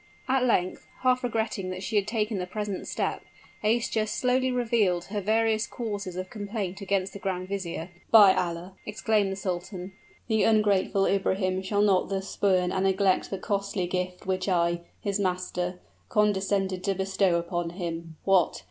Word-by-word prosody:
At 260 -1 +2
length, 185 -6 0
half 255 0 +3
regretting 220 -5 -1
that 185 +1 -5
she 220 - -3
had 205 -1 +2
taken 215 -2 -1
the 180 - -3
present 205 0 -4
step, - - -2 0.4
Aischa 220 0 +1
slowly 255 +3 +1
revealed 225 -8 +1
her 205 +1 -3
various 220 +2 +2
causes 205 -6 -4
of 185 0 -5
complaint 205 -3 -4
against 195 -1 -1
the 200 - -7
grand 185 -1 -3
vizier. 175 -3 -4 0.2
"By 205 -4 +8
Allah!" 175 +2 -2
exclaimed 210 -1 +1
the - - -2
sultan, 185 0 -4 0.4
"the 220 -2 +2
ungrateful 205 -3 +3
Ibrahim 190 -1 +1
shall 205 +2 +1
not 195 -3 +3
thus 195 0 -2
spurn 185 -3 +2
and 190 0 0
neglect 190 -1 +2
the 195 - -3
costly 200 -1 -1
gift 180 0 -3
which 185 0 -1
I, 170 -1 +2 0.2
his 200 0 -1
master, 180 -1 -2 0.3
condescended 195 -2 +1
to 195 -1 +1
bestow 190 -1 +1
upon 170 0 -1
him! 170 -2 -5
What! 190 -3 +3
195 Hz, 160 wpm, -27 LUFS, 185-210 Hz, 0.4 s, By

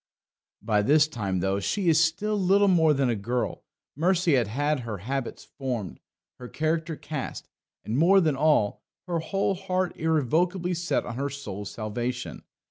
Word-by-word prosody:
By 105 -2 +2
this 145 +7 +4
time, 100 - -2
though 95 +1 0
she 185 - -1
is 165 0 +5
still 200 +7 0
little 200 +1 +3
more 165 -4 +4
than 135 -2 +2
a 120 - +1
girl, 120 +5 -3 0.3
Mercy 175 +2 +2
had 135 +5 +1
her 115 -4 -5
habits 130 +6 -4 0.2
formed, 120 -9 -3 0.4
her 125 - -8
character 160 +3 -1
cast, 150 -2 -6 0.4
and, 115 +5 -1
more 190 +5 +6
than 155 -6 +2
all, 145 -8 +2 0.2
her 175 -2 -1
whole 195 +4 0
heart 185 -1 -2
irrevocably 165 +4 +1
set 175 0 -1
on 120 - -6
her 140 +1 -1
soul's 105 -8 -6
salvation. 120 +3 -4
150 Hz, 155 wpm, -26 LUFS, 120-175 Hz, 0.4 s, more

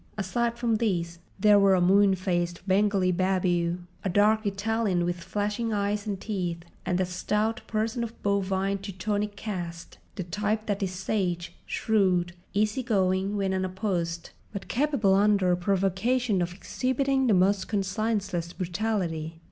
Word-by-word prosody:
Aside 235 +4 -1
from 235 -2 +1
these 170 -6 -1 0.2
there 205 +1 +6
were 195 -1 +5
a - - +2
moon 195 +2 +5
faced 175 0 -2
Bengali 195 -1 +3
babu, 180 -1 +1 0.2
a 195 - 0
dark 210 +3 +3
Italian 200 -2 0
with 175 0 -2
flashing 205 +5 -2
eyes 205 0 -1
and 200 -2 -2
teeth, 175 -6 -3 0.2
and 180 0 +1
a 185 - +2
stout 210 +6 -1
person 225 +2 -1
of 230 0 -7
bovine 195 -1 0
Teutonic 205 +1 -3
cast—the 185 -2 -6
type 210 +4 -2
that 205 0 -2
is 190 -2 -1
sage, 185 -2 -2
shrewd, 185 -5 +1 0.2
easy 215 +4 +1
going 195 -3 +1
when 195 -1 0
unopposed, 185 -3 -2 0.2
but 200 -2 -6
capable 255 -7 +2
under 195 -2 +4
provocation 195 +4 +1
of 175 0 -1
exhibiting 260 +7 0
the 215 - +4
most 190 +1 +2
conscienceless 195 -4 -1
brutality. 175 -4 -2
195 Hz, 140 wpm, -27 LUFS, 180-215 Hz, 0.2 s, there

